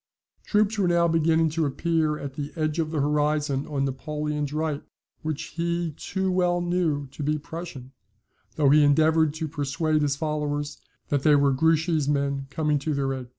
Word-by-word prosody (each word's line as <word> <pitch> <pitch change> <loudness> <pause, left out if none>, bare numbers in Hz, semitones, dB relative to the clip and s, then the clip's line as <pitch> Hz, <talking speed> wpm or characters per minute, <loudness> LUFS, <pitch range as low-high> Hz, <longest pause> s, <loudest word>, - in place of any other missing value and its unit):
Troops 210 0 +1
were 190 - +3
now 170 -1 +3
beginning 165 0 +3
to 160 -1 0
appear 155 +1 0
at 140 -2 -6
the 145 +1 -5
edge 155 0 -1
of 160 -1 0
the 155 -1 -2
horizon 150 -1 0
on 140 -3 -1
Napoleon's 150 +1 -3
right, 155 -1 -2 0.4
which 155 -2 -4
he 170 0 -1
too 190 +5 -2
well 180 -1 +2
knew 175 -5 0
to 150 - -9
be 150 +1 0
Prussian, 150 -4 -8 0.6
though 145 -3 +4
he 150 +1 +6
endeavoured 155 +2 +4
to 160 0 -3
persuade 150 +1 0
his 145 -2 +1
followers 150 -1 -2 0.3
that 145 -2 +1
they 150 +1 +5
were 140 -1 +4
Grouchy's 160 +1 +2
men 140 -1 0
coming 150 +1 0
to 150 +1 -2
their 135 -1 0
aid. 130 -2 -6
150 Hz, 175 wpm, -25 LUFS, 145-160 Hz, 0.6 s, he